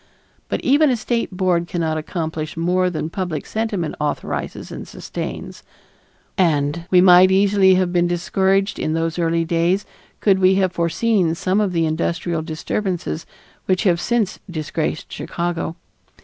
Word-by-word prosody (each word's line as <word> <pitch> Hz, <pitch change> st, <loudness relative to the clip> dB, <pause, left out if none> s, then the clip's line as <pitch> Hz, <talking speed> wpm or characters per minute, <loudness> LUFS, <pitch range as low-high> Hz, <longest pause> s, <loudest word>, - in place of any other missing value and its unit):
But -, -, -2 dB
even 290 Hz, +3 st, +4 dB
a 255 Hz, -, +2 dB
state 235 Hz, +1 st, -1 dB
board 180 Hz, -2 st, 0 dB
cannot 165 Hz, -2 st, -1 dB
accomplish 160 Hz, -1 st, -4 dB
more 180 Hz, +2 st, +1 dB
than 160 Hz, -2 st, -4 dB
public 180 Hz, -5 st, -3 dB
sentiment 215 Hz, -7 st, -2 dB
authorizes 150 Hz, -1 st, -3 dB
and -, -, -7 dB
sustains, -, -, -6 dB, 0.8 s
and 165 Hz, -1 st, +1 dB
we 180 Hz, -1 st, +6 dB
might 180 Hz, 0 st, +7 dB
easily 195 Hz, 0 st, +4 dB
have 185 Hz, -1 st, +1 dB
been 175 Hz, -1 st, +3 dB
discouraged 190 Hz, +3 st, +1 dB
in 155 Hz, -, -1 dB
those 165 Hz, +1 st, -1 dB
early 165 Hz, 0 st, +1 dB
days 170 Hz, +4 st, +1 dB, 0.3 s
could 195 Hz, -2 st, +3 dB
we 185 Hz, 0 st, +5 dB
have 190 Hz, -2 st, +1 dB
foreseen 170 Hz, 0 st, +1 dB
some 185 Hz, +4 st, +1 dB
of 200 Hz, -3 st, 0 dB
the 165 Hz, -2 st, +1 dB
industrial 165 Hz, +1 st, -1 dB
disturbances 160 Hz, -, -3 dB, 0.4 s
which 185 Hz, +1 st, +1 dB
have 175 Hz, -4 st, +2 dB
since 235 Hz, -5 st, 0 dB
disgraced 155 Hz, -1 st, -3 dB
Chicago. 170 Hz, -1 st, -3 dB
175 Hz, 145 wpm, -20 LUFS, 165-190 Hz, 0.8 s, might